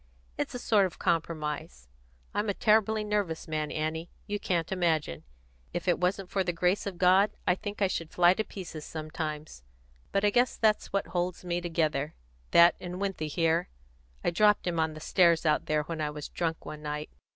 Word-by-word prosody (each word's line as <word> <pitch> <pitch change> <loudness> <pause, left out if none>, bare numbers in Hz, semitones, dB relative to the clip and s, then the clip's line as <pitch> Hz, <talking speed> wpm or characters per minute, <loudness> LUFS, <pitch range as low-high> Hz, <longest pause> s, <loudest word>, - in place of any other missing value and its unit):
It's - - -3
a - - -1
sort 210 -5 +3
of 180 - -13
compromise. 150 - -2 0.5
I'm 210 +1 0
a 200 - 0
terribly 220 0 +3
nervous 205 -6 -1
man, 155 -1 -2
Annie; 160 +2 -3 0.2
you 205 0 -3
can't 170 -3 -1
imagine. 160 - 0 0.5
If 175 +1 -3
it 175 - +3
wasn't 180 +1 -1
for 195 - +1
the 175 - 0
grace 180 +4 +1
of 190 -3 -5
God, 190 +3 +5 0.2
I 180 - +4
think 205 +2 -4
I - - +5
should 165 -3 -3
fly 175 +1 +5
to 220 - -1
pieces 175 -7 -8
sometimes. 155 - -5 0.5
But 200 +1 +1
I 205 - +4
guess 245 +3 +2
that's 215 -2 +2
what 200 0 -1
holds 180 0 -2
me 175 0 -1
together 155 -4 -1 0.3
that 170 0 +7
and 180 0 -6
Winthy 195 -6 -2
here. 165 +2 +1 0.5
I - - +2
dropped 210 +4 +4
him 170 -2 -1
on 160 -1 0
the - - -8
stairs 170 0 +3
out 150 -1 +2
there, 150 -1 +1
when 160 0 -5
I 150 - 0
was 150 -1 -7
drunk, 165 -1 -3
one 150 0 -7
night. 150 0 -4
175 Hz, 195 wpm, -29 LUFS, 155-195 Hz, 0.5 s, that